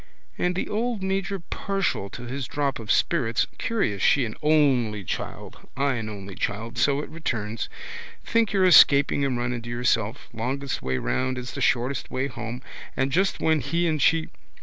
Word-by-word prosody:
And 180 0 0
the - - -2
old 225 -1 -1
major, 195 0 -1
partial 190 - -2
to 125 - -9
his 125 +1 -4
drop 140 -1 -1
of 110 -1 -9
spirits. 115 0 +2
Curious 155 - -1
she 135 - +4
an 110 - -5
only 130 -9 +3
child, - - -6
I 140 0 +2
an 115 -3 -3
only 100 -2 -8
child. 110 +5 -3
So 140 0 +3
it - - -8
returns. 115 -9 -3 0.6
Think 230 -2 +2
you're 195 -2 +3
escaping 145 -5 +6
and 135 -3 0
run 120 +1 -1
into 120 -1 -6
yourself. 120 -1 0
Longest 130 +4 -3
way 65 0 -1
round 130 - -1
is 125 0 -5
the - - -5
shortest 125 +2 +1
way 130 +1 -1
home. 120 -1 -6 0.3
And 135 +1 +1
just 190 +7 +1
when 160 -1 +2
he 170 +4 0
and 155 -3 0
she. 160 +3 +3
135 Hz, 175 wpm, -25 LUFS, 115-160 Hz, 0.6 s, escaping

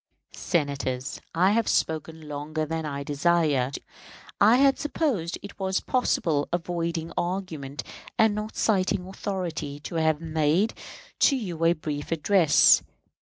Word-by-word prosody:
Senators, 140 -6 -2
I 185 +4 +4
have 225 +1 +1
spoken 160 0 -1
longer 150 +2 -3
than 160 0 -3
I 140 -1 -4
desired. 145 -3 +1 0.6
I 225 - +6
had 275 +1 +4
supposed 275 - -1
it 200 - -10
was 190 0 0
possible, 165 - 0
avoiding 170 -1 -2
argument 170 -6 -3 0.3
and 220 -1 +4
not 210 +1 -5
citing 190 -3 +1
authority, 180 -7 -4
to 165 - -5
have 160 -1 +2
made 160 +5 +1 0.5
to 280 - +5
you 180 -10 -4
a 170 - +5
brief 150 -2 -5
address. 165 0 +5
165 Hz, 125 wpm, -26 LUFS, 150-190 Hz, 0.6 s, I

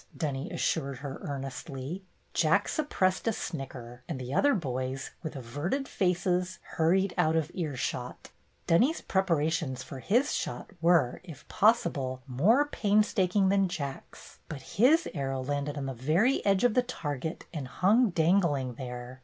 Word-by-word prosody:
Dunny 140 -2 -3
as - - -5
sured 140 -4 0
her 140 +1 -6
earnestly. 135 +4 -5 0.3
Jack - - +3
suppressed 195 - 0
a - - +4
snicker, 125 -8 -6
and 150 -6 -3
the 130 +1 -5
other 285 - +4
boys, 130 - -3
with 160 -2 -6
averted 145 - -3
faces, 180 -1 0
hurried 185 +4 +2
out 160 -2 +3
of 160 0 0
earshot. 135 -6 -4 0.3
Dunny's 250 - +3
preparations 160 -7 0
for 135 - -8
his 240 - +2
shot - - -4
were, 165 -7 +3
if 165 -5 -12
possible, 155 - +2
more 190 - +3
painstaking 205 -6 +2
than 195 -1 +3
Jack's, 140 -7 -7
but 140 -4 -7 0.2
his 310 +8 +5
arrow 135 -4 -2
landed 145 +2 -2
on 140 - -3
the 135 - -3
very 160 - +2
edge 195 +1 +3
of 245 -3 +4
the 250 - +4
target 160 - -5
and 145 -5 -4
hung 215 - +3
dangling 160 -7 +2
there. 125 0 -7
160 Hz, 145 wpm, -29 LUFS, 135-195 Hz, 0.3 s, his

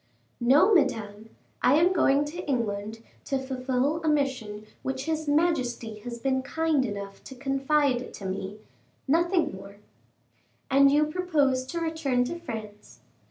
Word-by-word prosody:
"No, 285 - +5
Madame; 220 - 0 0.3
I 260 - +5
am 345 +4 +4
going 285 -4 +3
to 345 +4 -6
England 220 -3 -2 0.2
to 275 - 0
fulfil 265 +3 -1
a - - -1
mission 255 -8 -1 0.2
which 265 0 -3
his 315 -1 -2
majesty 265 -8 0
has 235 +2 -7
been 260 +2 0
kind 310 0 0
enough 200 -1 -7
to 265 - -9
confide 270 -1 0
to 200 - -9
me 190 +2 -5 0.5
nothing 340 - +2
more." 195 +1 -11 1.0
"And 275 +1 +6
you 300 +1 +4
propose 300 -6 0
to 340 +5 -3
return 320 -6 0
to 340 +7 -4
France?" 215 -9 -8
265 Hz, 140 wpm, -27 LUFS, 225-305 Hz, 1.0 s, And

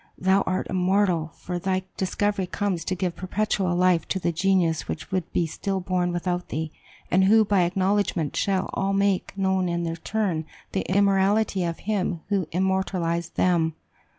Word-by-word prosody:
Thou 190 +2 +3
art 185 - 0
immortal; 180 -3 +1
for 180 0 -5
thy 185 +1 -1
discovery 195 0 -1
comes 185 -3 -2
to 185 - -1
give 180 -1 -2
perpetual 190 -1 -1
life 180 -1 +3
to - - -1
the 170 - 0
genius 170 -2 +1
which 160 - -5
would 185 -3 -2
be 170 - +1
still 195 +4 -3
born 180 -1 0
without 175 0 -2
thee, 160 0 -3 0.4
and 190 +1 +4
who, 220 +2 +6
by 200 -2 +3
acknowledgment, 190 -3 0
shall 190 -2 0
all 195 0 0
make 200 -1 +1
known 190 -2 +1
in 170 0 -1
their 165 -1 -2
turn 175 -4 -2 0.2
the 190 - 0
immortality 200 0 +3
of 170 -1 -3
him 190 -5 -1
who 195 -5 0
immortalized 180 -2 -1
them!" 165 -3 +2
185 Hz, 165 wpm, -25 LUFS, 175-195 Hz, 0.4 s, who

